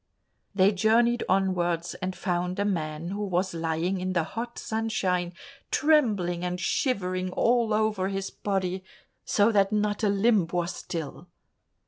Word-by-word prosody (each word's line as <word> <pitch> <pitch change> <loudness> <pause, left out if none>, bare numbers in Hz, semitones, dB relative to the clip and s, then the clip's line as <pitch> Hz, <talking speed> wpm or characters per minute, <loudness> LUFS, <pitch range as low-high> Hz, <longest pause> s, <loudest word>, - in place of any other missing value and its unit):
They 195 +1 +5
journeyed 230 +4 +3
onwards 180 -3 +1
and 185 +1 -4
found 180 -1 -2
a 200 - 0
man 160 -4 -2
who 205 +2 -3
was 185 -1 -1
lying 165 +3 -1
in 185 0 -2
the 170 -2 +2
hot 235 +8 -6
sunshine, 190 -6 -1 0.4
trembling 210 - +2
and 180 0 -2
shivering 185 -3 0
all 235 -2 +2
over 215 -3 +1
his 195 0 -3
body, 190 -2 -2 0.4
so 205 +2 +3
that 200 -2 +3
not 210 0 0
a 210 - +3
limb 200 -2 +3
was 175 0 -2
still. 165 0 -6
190 Hz, 140 wpm, -27 LUFS, 180-210 Hz, 0.4 s, They